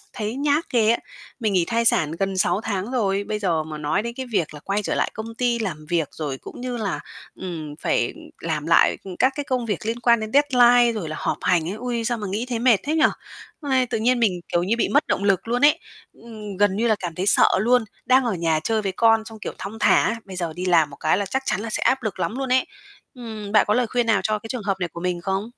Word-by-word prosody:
thấy 215 Hz, +2 st, -4 dB
nhát 290 Hz, +3 st, +1 dB
ghê 225 Hz, -3 st, +4 dB
á. 235 Hz, -, +2 dB, 0.4 s
Mình 215 Hz, -3 st, 0 dB
nghỉ 180 Hz, -3 st, +3 dB
thai 230 Hz, +4 st, 0 dB
sản 160 Hz, -9 st, +2 dB
gần 195 Hz, -1 st, -1 dB
6 185 Hz, -, +2 dB
tháng 205 Hz, 0 st, -3 dB
rồi, 200 Hz, -5 st, 0 dB
bây 210 Hz, +1 st, -3 dB
giờ 170 Hz, -6 st, 0 dB
mà 155 Hz, 0 st, -7 dB
nói 150 Hz, +7 st, 0 dB
đến 235 Hz, +1 st, -5 dB
cái 260 Hz, -1 st, -5 dB
việc 160 Hz, -7 st, 0 dB
là 150 Hz, -, -9 dB
quay 200 Hz, +6 st, -2 dB
trở -, -, -2 dB
lại -, -, 0 dB
công 225 Hz, +1 st, -7 dB
ty 240 Hz, 0 st, 0 dB
làm 155 Hz, -9 st, -4 dB
việc 165 Hz, -4 st, 0 dB
rồi 145 Hz, -4 st, -4 dB
cũng -, -, -11 dB
như 250 Hz, 0 st, -4 dB
là, 210 Hz, -4 st, -2 dB, 0.3 s
ừm, 160 Hz, -5 st, -6 dB
phải 120 Hz, -, 0 dB, 0.3 s
làm 155 Hz, -2 st, -3 dB
lại, 170 Hz, -, +4 dB
ừm, 190 Hz, -2 st, -8 dB
các 260 Hz, -, +3 dB
cái 290 Hz, -, -3 dB
công 255 Hz, -3 st, -1 dB
việc 210 Hz, -1 st, -3 dB
liên 230 Hz, +1 st, -2 dB
quan 235 Hz, -1 st, +4 dB
đến 215 Hz, 0 st, -5 dB
deadline 245 Hz, -4 st, +5 dB
rồi 165 Hz, -, -5 dB
là 155 Hz, -, -5 dB
họp -, -, -2 dB
hành 175 Hz, -3 st, +2 dB
ấy, 190 Hz, -, -3 dB
ôi, 240 Hz, -1 st, -2 dB
sao 240 Hz, +1 st, -1 dB
mà 210 Hz, -, -4 dB
nghĩ 215 Hz, +5 st, -2 dB
thấy 240 Hz, -2 st, -2 dB
mệt 240 Hz, -1 st, +5 dB
thế 300 Hz, +3 st, -1 dB
nhỉ? 320 Hz, -1 st, +3 dB, 0.6 s
Ây, 265 Hz, -4 st, +1 dB
tự 230 Hz, -2 st, -2 dB
nhiên 240 Hz, +3 st, +2 dB
mình, 190 Hz, -6 st, +1 dB
kiểu 175 Hz, -, +2 dB
như, 200 Hz, +6 st, 0 dB
bị 235 Hz, -, +1 dB
mất 290 Hz, -, +2 dB
động 200 Hz, -, -1 dB
lực 200 Hz, +1 st, +1 dB
luôn 245 Hz, +4 st, +1 dB
ấy, 300 Hz, +2 st, +5 dB, 0.4 s
ừm, 215 Hz, -4 st, -8 dB
gần 205 Hz, -1 st, +2 dB
như 230 Hz, +3 st, +1 dB
là 220 Hz, -2 st, +3 dB
cảm 175 Hz, -5 st, -5 dB
thấy 185 Hz, +4 st, -3 dB
sợ -, -, +5 dB
luôn, 240 Hz, +3 st, +3 dB, 0.2 s
đang 260 Hz, +1 st, +4 dB
ở 235 Hz, -4 st, 0 dB
nhà 165 Hz, -3 st, 0 dB
chơi 220 Hz, -1 st, 0 dB
với 195 Hz, -2 st, -2 dB
con 225 Hz, +1 st, +3 dB
xong, 220 Hz, 0 st, -10 dB
kiểu, -, -, -5 dB
thong 215 Hz, +3 st, -7 dB
thả, 230 Hz, -, +3 dB
bây 190 Hz, -2 st, -9 dB
giờ 170 Hz, -3 st, -3 dB
đi 180 Hz, +3 st, -6 dB
làm 165 Hz, -5 st, +3 dB
một 140 Hz, -, -11 dB
cái 155 Hz, +5 st, +1 dB
là 200 Hz, -, -2 dB
chắc 265 Hz, +7 st, -2 dB
chắn 195 Hz, -, 0 dB
là 225 Hz, +1 st, -5 dB
sẽ -, -, -3 dB
áp 260 Hz, +2 st, +2 dB
lực 215 Hz, -5 st, -4 dB
lắm 230 Hz, -, -2 dB
luôn 270 Hz, -1 st, -2 dB
ấy. 260 Hz, -, +3 dB, 0.5 s
Ừm, 220 Hz, -5 st, -7 dB
bạn 210 Hz, -2 st, +5 dB
có 210 Hz, -, +3 dB
lời 245 Hz, +1 st, +2 dB
khuyên 240 Hz, +1 st, 0 dB
nào 220 Hz, -4 st, +3 dB
cho 215 Hz, +2 st, 0 dB
cái 225 Hz, +2 st, -10 dB
trường 245 Hz, -1 st, -4 dB
hợp 195 Hz, -1 st, -1 dB
này 180 Hz, -, -1 dB
của 170 Hz, +1 st, -9 dB
mình 180 Hz, -1 st, -2 dB
không? 195 Hz, +4 st, -2 dB
215 Hz, 275 wpm, -23 LUFS, 185-240 Hz, 0.6 s, deadline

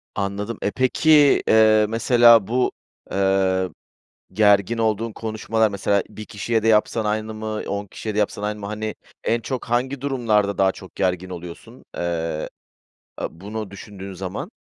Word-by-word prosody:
Anladım. 100 Hz, +2 st, -3 dB
E, 100 Hz, -, 0 dB
peki, 145 Hz, +3 st, +4 dB
eee, 110 Hz, -1 st, +5 dB
mesela, 115 Hz, -2 st, +5 dB
bu, 125 Hz, +2 st, +1 dB, 0.4 s
eee, 95 Hz, -1 st, +1 dB, 0.6 s
gergin 105 Hz, +2 st, +3 dB
olduğun 110 Hz, 0 st, 0 dB
konuşmalar, 110 Hz, 0 st, -1 dB
mesela, 100 Hz, 0 st, +1 dB
1 110 Hz, 0 st, -9 dB
kişiye 110 Hz, +2 st, -2 dB
de 115 Hz, -, +1 dB
yapsan 110 Hz, +1 st, +2 dB
aynı 110 Hz, +1 st, -2 dB
mı, 110 Hz, 0 st, -6 dB
10 105 Hz, -1 st, -3 dB
kişiye 105 Hz, +2 st, -6 dB
de -, -, -1 dB
yapsan 105 Hz, 0 st, -1 dB
aynı 105 Hz, 0 st, -2 dB
mı? 100 Hz, -, -5 dB
Hani, 105 Hz, 0 st, -4 dB, 0.3 s
en 115 Hz, 0 st, +1 dB
çok 130 Hz, +2 st, -4 dB
hangi 125 Hz, +3 st, -1 dB
durumlarda 115 Hz, -7 st, 0 dB
daha 95 Hz, -1 st, +3 dB
çok 95 Hz, -, -13 dB
gergin 90 Hz, 0 st, -1 dB
oluyorsun, 85 Hz, -1 st, -10 dB
eee, 80 Hz, -2 st, -2 dB, 0.7 s
eee, -, -, -1 dB
bunu 100 Hz, +4 st, -7 dB
düşündüğün 100 Hz, -1 st, -9 dB
zaman? 95 Hz, -, -5 dB
105 Hz, 150 wpm, -22 LUFS, 100-115 Hz, 0.7 s, eee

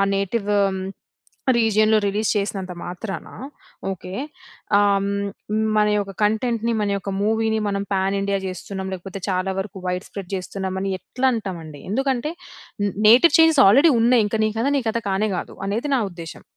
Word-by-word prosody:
Native 200 Hz, +2 st, -1 dB, 1.1 s
రీజియన్‌లో, 220 Hz, -1 st, +4 dB
release 205 Hz, +2 st, 0 dB
చేసినంత 195 Hz, -2 st, -3 dB
మాత్రానా, 195 Hz, +3 st, -6 dB, 0.6 s
okay. 185 Hz, 0 st, -7 dB, 0.6 s
హ్మ్. 200 Hz, -1 st, +3 dB, 0.7 s
మన 210 Hz, -, +4 dB
యొక్క 200 Hz, -1 st, -3 dB
కంటెంట్‌ని, 230 Hz, +2 st, +1 dB
మన 205 Hz, -, 0 dB
యొక్క 195 Hz, -, -6 dB
మూవీని, 220 Hz, +1 st, +1 dB
మనం 200 Hz, 0 st, -1 dB
పాన్ 195 Hz, +1 st, +1 dB
ఇండియా 200 Hz, 0 st, 0 dB
చేస్తున్నాం, 190 Hz, +1 st, -5 dB
లేకపోతే 190 Hz, +1 st, -7 dB
చాలా 185 Hz, +1 st, 0 dB
వరకు 195 Hz, 0 st, -5 dB
వైడ్ 180 Hz, +1 st, -2 dB
స్ప్రెడ్ 195 Hz, -2 st, -8 dB
చేస్తున్నామని 190 Hz, +1 st, -3 dB
ఎట్లా 260 Hz, +5 st, -1 dB
అంటామండి? 170 Hz, -9 st, -6 dB
ఎందుకంటే, 270 Hz, +4 st, 0 dB, 0.8 s
నేటివ్ 260 Hz, +9 st, +7 dB
చేంజెస్ 320 Hz, -3 st, +6 dB
ఆల్రెడీ 280 Hz, +11 st, +6 dB
ఉన్నాయి. 235 Hz, 0 st, +4 dB
ఇంక 210 Hz, -, -3 dB
నీ -, -, +2 dB
కథ, 240 Hz, -, +1 dB
నీ -, -, 0 dB
కథ 220 Hz, -, -1 dB
కానే 200 Hz, +3 st, +1 dB
కాదు, -, -, -6 dB
అనేది 225 Hz, +8 st, -2 dB
నా 255 Hz, -, +1 dB
ఉద్దేశ్యం. 170 Hz, -2 st, -9 dB
200 Hz, 145 wpm, -22 LUFS, 190-225 Hz, 1.1 s, నేటివ్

